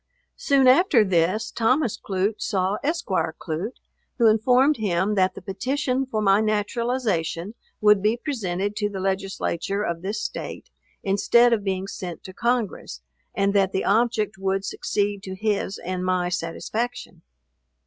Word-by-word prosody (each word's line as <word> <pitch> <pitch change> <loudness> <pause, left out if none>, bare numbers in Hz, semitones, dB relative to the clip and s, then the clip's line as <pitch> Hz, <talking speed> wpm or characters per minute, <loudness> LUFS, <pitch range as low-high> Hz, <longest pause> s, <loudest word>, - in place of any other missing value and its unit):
Soon 275 -2 +3
after 260 - +5
this 185 +4 +1
Thomas 240 +1 +1
Clute 195 +2 -2
saw 195 0 0
Esq. 320 +4 -1
Clute, 175 +3 -3 0.4
who 235 - +3
informed 250 +7 +4
him 200 -1 0
that 185 -2 +2
the - - -10
petition 255 +7 -1
for 215 -4 -2
my 195 +1 +4
naturalization 215 -4 -1 0.3
would 210 -2 +5
be 215 +3 +2
presented 205 - -3
to 210 -1 0
the 195 -2 -6
Legislature 195 0 -2
of 170 -4 -3
this 205 +3 -3
State, - - -6 0.3
instead 235 +5 +4
of 215 -3 0
being 190 -1 -2
sent 180 -4 -7
to 185 - -10
Congress; 220 - -2 0.3
and 200 0 +1
that 195 -2 +2
the 190 - -1
object 220 -2 +1
would 195 0 -1
succeed 205 0 -2
to 190 -1 -7
his 205 -1 -1
and 185 +1 -4
my 185 -1 0
satisfaction. 180 +4 -4
205 Hz, 145 wpm, -24 LUFS, 190-230 Hz, 0.4 s, after